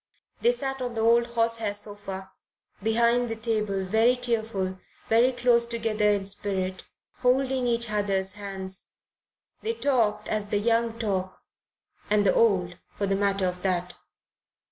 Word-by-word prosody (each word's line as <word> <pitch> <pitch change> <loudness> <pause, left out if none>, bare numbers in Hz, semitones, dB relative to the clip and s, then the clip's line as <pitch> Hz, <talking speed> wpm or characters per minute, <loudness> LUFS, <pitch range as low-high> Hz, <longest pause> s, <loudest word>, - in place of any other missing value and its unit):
They 475 - +5
sat 270 - -3
on 245 -2 -3
the 225 - -1
old 235 +1 +4
horsehair 230 -3 0
sofa, 205 -2 -6 0.5
behind 235 +3 +2
the 225 - -2
table, 215 -4 -1
very 225 +6 +3
tearful, 220 -6 -1 0.3
very 235 +3 +5
close 245 -1 +3
together 225 -2 0
in 200 -1 +1
spirit, 190 -2 -2 0.3
holding 260 0 +1
each 235 -2 +1
other's 195 -2 0
hands. 195 -2 -5 0.7
They 450 +1 -1
talked 245 - +1
as 215 -1 -1
the 205 - 0
young 230 +1 +1
talk 190 -5 -2 0.7
and 205 -1 +3
the 190 - +4
old, 185 -6 +2
for 200 - -3
the 195 0 +1
matter 195 -1 +1
of 180 0 -3
that. 180 -1 -1
215 Hz, 145 wpm, -26 LUFS, 195-235 Hz, 0.7 s, They